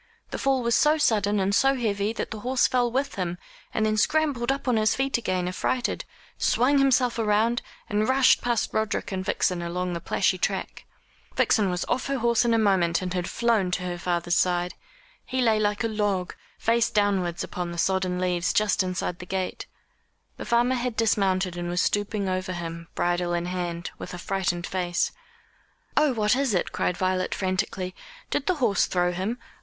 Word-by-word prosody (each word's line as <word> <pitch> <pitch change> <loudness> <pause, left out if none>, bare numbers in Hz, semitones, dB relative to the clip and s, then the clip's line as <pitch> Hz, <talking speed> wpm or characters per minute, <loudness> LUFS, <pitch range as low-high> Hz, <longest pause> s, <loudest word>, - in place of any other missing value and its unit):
The - - -4
fall 270 -2 +1
was 235 0 +1
so 300 +6 +4
sudden 210 -7 +2
and 195 +1 +1
so 270 +6 +4
heavy, 210 -4 -1
that - - -4
the 215 - -5
horse 250 +3 +2
fell 245 -2 +1
with 275 +3 -1
him, 180 -2 -2 0.3
and 220 - 0
then 215 0 +1
scrambled 275 -1 +1
up 275 0 -4
on 250 - +3
to 225 - +3
his 215 - +2
feet 270 -2 0
again 185 -5 -1
affrighted, 240 +7 -1 0.3
swung 275 +4 +3
himself 255 -3 +3
round, 225 +2 +2 0.3
and 215 0 0
rushed 260 0 +5
past 240 -2 0
Roderick 220 -1 -1
and 190 -1 -2
Vixen 180 -1 0
along 180 +1 -2
the 170 - -4
plashy - - +1
track. - - -3 0.5
Vixen 205 -3 +3
was 180 0 -2
off 250 +1 -1
her 275 0 -1
horse 235 -1 +2
in 235 -1 +2
a - - +3
moment, 190 -5 +2
and 180 -1 -3
had 180 -1 -2
flown 230 -6 +1
to 180 +1 -2
her 175 -1 -4
father's 175 -1 0
side. 180 0 +1 0.5
He 260 - -3
lay 225 -3 +3
like 210 +1 0
a - - +2
log, 205 -4 -1 0.2
face 230 0 +2
downwards 195 -5 0
upon 175 -1 -4
the 170 - -7
sodden 185 0 0
leaves 180 -1 0
just 210 -2 +2
inside 180 -1 -3
the 180 - -9
gate. 185 0 -3 0.7
The - - -6
farmer 240 +2 +2
had 245 -2 -2
dismounted 195 -5 +1
and 175 0 -4
was 175 0 -1
stooping 205 +1 0
over 185 0 -2
him, 170 -1 -6
bridle 175 0 0
in 170 0 -2
hand, 175 -1 -4
with 180 - -7
a - - -7
frightened 175 -2 -2
face. 180 -1 -1 0.8
"Oh, 300 -2 +4
what 215 -1 +2
is 265 -6 +1
it?" 175 - 0
cried 180 - -1
Violet 185 0 0
frantically. 185 -1 -2 0.4
"Did 280 - -1
the 370 - +2
horse 235 - +2
throw 180 -1 +1
him? 190 +7 -3
200 Hz, 190 wpm, -26 LUFS, 180-235 Hz, 0.8 s, rushed